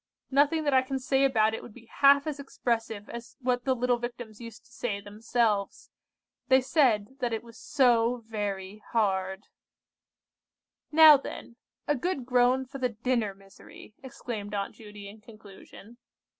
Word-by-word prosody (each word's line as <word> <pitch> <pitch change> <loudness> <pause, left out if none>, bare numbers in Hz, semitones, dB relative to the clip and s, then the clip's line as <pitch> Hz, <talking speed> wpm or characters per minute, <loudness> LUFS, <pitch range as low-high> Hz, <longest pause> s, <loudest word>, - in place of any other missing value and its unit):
Nothing 290 +4 +3
that 290 -2 +1
I 260 - +5
can 265 +1 -4
say 265 +1 +1
about 220 -5 +3
it - - -4
would 215 - -13
be 240 -2 -15
half 280 +4 +4
as 300 -2 -4
expressive 225 -6 -3
as 235 0 -10
what 250 -2 -1
the 260 -1 +2
little 245 0 0
Victims 240 -2 -7
used 230 -2 -11
to - - -24
say 220 -4 -3
themselves. 210 0 -2 0.6
They 260 0 +5
said 260 -4 +1
that 245 -3 -1
it 225 - -3
was 230 -1 -15
'so 245 -6 +2
very 205 -2 -5
hard.' 190 -3 0 1.5
"Now, 310 -1 +9
then, 250 -3 -9 0.3
a 295 - +3
good 285 -2 -3
groan 250 +1 +2
for 270 +2 -9
the 250 -1 0
dinner 230 -2 -2
misery," 195 +2 -16
exclaimed 220 -5 -6
Aunt 200 -1 -3
Judy 210 -2 -11
in 210 +2 -13
conclusion. 215 +1 -15
235 Hz, 155 wpm, -28 LUFS, 210-260 Hz, 1.5 s, Now